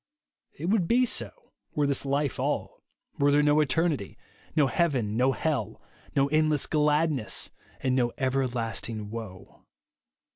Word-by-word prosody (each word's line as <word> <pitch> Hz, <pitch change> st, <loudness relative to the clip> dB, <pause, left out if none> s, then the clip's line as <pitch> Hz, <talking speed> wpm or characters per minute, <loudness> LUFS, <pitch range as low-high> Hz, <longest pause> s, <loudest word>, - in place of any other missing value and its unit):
It 155 Hz, -, -5 dB
would 190 Hz, -2 st, +2 dB
be 250 Hz, +5 st, +4 dB
so -, -, -1 dB, 0.5 s
were 150 Hz, -, +2 dB
this 140 Hz, 0 st, 0 dB
life 140 Hz, 0 st, 0 dB
all; -, -, -2 dB, 0.4 s
were 140 Hz, -, +4 dB
there 145 Hz, +1 st, +4 dB
no 150 Hz, +1 st, +4 dB
eternity, 150 Hz, -, 0 dB, 0.4 s
no 150 Hz, -3 st, +5 dB
heaven, 135 Hz, -, 0 dB
no 130 Hz, +3 st, +3 dB
hell, 135 Hz, -7 st, -2 dB, 0.4 s
no 140 Hz, 0 st, +3 dB
eniless 155 Hz, -1 st, +2 dB
gladness, 150 Hz, -4 st, +1 dB, 0.3 s
and 130 Hz, -1 st, +1 dB
no 120 Hz, -2 st, +2 dB
everlasting 120 Hz, -5 st, -2 dB
woe. 100 Hz, -4 st, -9 dB
140 Hz, 135 wpm, -27 LUFS, 120-155 Hz, 0.5 s, no